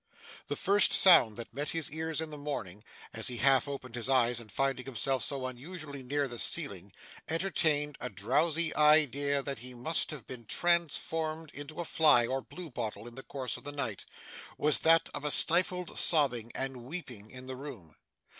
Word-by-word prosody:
The - - -3
first 200 +1 +4
sound 125 - +6
that 115 - -8
met 145 +4 -3
his 165 -3 -1
ears 160 0 -2
in 160 -1 -5
the - - -7
morning 105 -9 -6 0.3
as 110 0 0
he 125 - 0
half 135 +2 +3
opened 135 -4 -7
his 120 +1 -3
eyes, 120 -2 +2
and, 110 -3 -11
finding 135 +3 -1
himself 130 +1 -1
so 135 -2 -3
unusually 140 +3 -7
near 140 +2 -1
the 120 -2 -6
ceiling, 100 - 0 0.4
entertained 155 -4 0
a 125 - -4
drowsy 165 +3 0
idea 145 -2 +3
that 135 -3 -4
he 125 +1 -9
must 155 +7 +1
have 145 -8 -6
been 125 -3 -10
transformed 165 0 -1
into 145 +3 -9
a - - -5
fly 150 -8 +4
or 130 +2 -2
blue 175 +3 -9
bottle 110 -2 -5
in 120 - -11
the 135 - -8
course 130 -2 -5
of - - -11
the 145 - -4
night, 130 -8 -4 0.5
was 150 -2 +2
that 165 +1 +4
of 145 - -5
a 150 - -1
stifled 180 +4 +4
sobbing 125 -8 +2
and 135 -1 -3
weeping 125 - -8
in 130 +1 -10
the 130 0 -7
room. 125 - -10
140 Hz, 185 wpm, -30 LUFS, 125-155 Hz, 0.5 s, sound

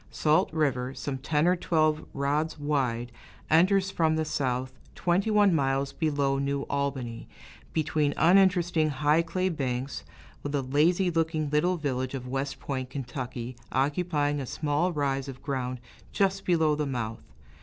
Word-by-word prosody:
Salt 155 +5 +2
River, 135 -5 0
some 135 -2 -4
ten 150 +4 +1
or 180 - +4
twelve 155 -3 +1
rods 145 +4 -1
wide, 130 -5 -1 0.4
enters 190 +4 +4
from 160 -3 +2
the 160 0 0
south 130 -3 -2 0.2
twenty 180 +5 +1
one 205 -3 +4
miles 135 -2 0
below 140 -4 0
New 140 0 -1
Albany, 135 -5 -3 0.4
between 155 -2 +1
uninteresting 175 -3 +4
high 150 +3 +2
clay 185 +3 -1
banks, 135 -5 -3 0.4
with 145 - -5
the 140 -2 0
lazy 170 +8 +2
looking 160 -2 0
little 175 +5 +2
village 130 -3 -2
of 125 -1 -6
West 135 +2 -3
Point, 130 -2 -4
Ky., 125 -2 -5 0.2
occupying 145 +1 0
a 135 - -4
small 150 +6 0
rise 140 -3 -1
of 135 -2 -9
ground 130 -3 -3 0.3
just 195 -1 0
below 160 -4 +3
the 150 -1 -1
mouth. 115 -4 -3
145 Hz, 145 wpm, -28 LUFS, 135-160 Hz, 0.4 s, or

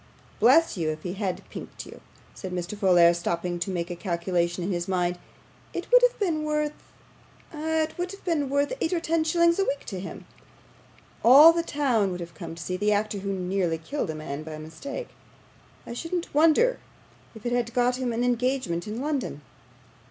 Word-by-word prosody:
Bless 275 +3 +5
you, 160 -3 0
if 155 0 -5
he 180 - -3
had 190 -2 -3
pinked - - -8
you,' - - -12 0.3
said 185 - -7
Mr. 180 +2 -4
Folair, 175 -4 +5
stopping 170 +1 -2
to 170 - -2
make 175 -1 -3
a - - -3
calculation 175 0 -1
in 190 - -2
his 175 -1 -2
mind, 180 -1 0 0.6
'it - - -5
would - - +8
have - - +3
been 335 -7 0
worth 300 0 0 0.8
ah, 320 +1 0
it 310 - -5
would 355 +1 -1
have 395 - -12
been 305 -6 0
worth 285 - +1
eight 325 - 0
or 345 - +1
ten 330 -1 +1
shillings 340 +2 +3
a - - +4
week 280 -6 -2
to 190 -4 -5
him. 190 - -8 1.0
All 285 +8 +9
the 335 - +1
town 265 - +1
would 180 -1 -4
have 170 -1 -7
come 165 - -8
to 165 - -7
see 180 +2 -3
the 210 +2 +1
actor 210 0 0
who 195 +1 -3
nearly 185 -3 -1
killed 165 - -4
a 160 - -3
man 155 -1 -5
by 155 0 -7
mistake; 160 - -7 0.8
I - - -6
shouldn't 335 +7 -4
wonder 330 +12 +4 0.6
if 220 - -12
it 240 - -1
had 240 -1 0
got 245 0 +2
him 255 -2 -1
an 230 +1 -1
engagement 245 -8 0
in 220 +4 -4
London. 275 - -3
215 Hz, 195 wpm, -26 LUFS, -, 1.0 s, All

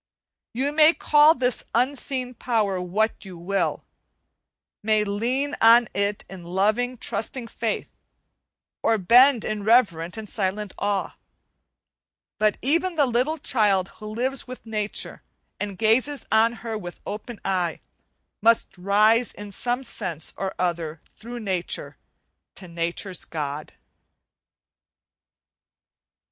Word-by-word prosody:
You 265 +5 -1
may 310 +2 +6
call 300 +2 +5
this 250 -1 -1
Unseen 255 0 -1
Power 215 -6 0
what 210 +5 -1
you 190 -3 -10
will 195 +4 -1 1.0
may 215 0 +2
lean 245 +8 -1
on 230 +1 +7
it 200 0 -1
in 190 -2 -10
loving, 215 +8 0
trusting 230 +3 -3
faith, 225 -2 -3 0.9
or 225 - +3
bend 245 +6 +5
in 215 -1 -3
reverent 200 -6 +3
and 220 -1 -6
silent 200 0 -2
awe; 205 -1 -1 1.2
but 215 -1 +2
even 335 +7 +1
the 295 -3 +4
little 255 +6 +1
child 205 - +1
who 215 - -8
lives 250 +6 -2
with 255 -1 -9
nature 215 -2 -4 0.4
and 200 -2 -4
gazes 245 +7 +2
on 225 +2 +4
her 225 -1 -3
with 175 -5 -7
open 210 +2 -6
eye, 180 -4 0 0.6
must 230 -3 +3
rise 215 +5 +3
in 205 0 -9
some 245 +6 -2
sense 175 - -5
or 190 -1 -4
other 170 -3 -2 0.2
through 240 +2 -8
nature 185 -4 -3 0.6
to 185 - -10
nature's 170 +2 -3
God. 150 -1 -5
215 Hz, 120 wpm, -24 LUFS, 195-245 Hz, 1.2 s, on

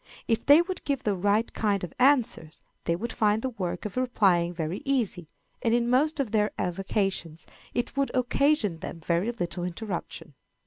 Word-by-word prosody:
If 225 - 0
they 295 +4 +8
would 370 +1 -5
give 280 -2 -1
the 210 - +1
right 205 +4 +1
kind 205 -3 0
of 180 - -5
answers, 250 - +2 0.2
they 170 - +1
would 225 +6 -4
find 215 0 +2
the 260 - -1
work 190 -6 -4
of 210 - -5
replying 195 -9 +2
very 165 +2 -4
easy, 225 - -1 0.3
and 230 0 +2
in 240 0 +1
most 300 +5 +2
of 255 -7 -1
their 210 -1 +2
avocations 185 -3 -2 0.3
it 240 +2 -2
would 275 0 +1
occasion 255 - +2
them 165 - -7
very 170 +8 0
little 175 -6 -4
interruption. 180 -4 -5
210 Hz, 175 wpm, -27 LUFS, 180-250 Hz, 0.3 s, they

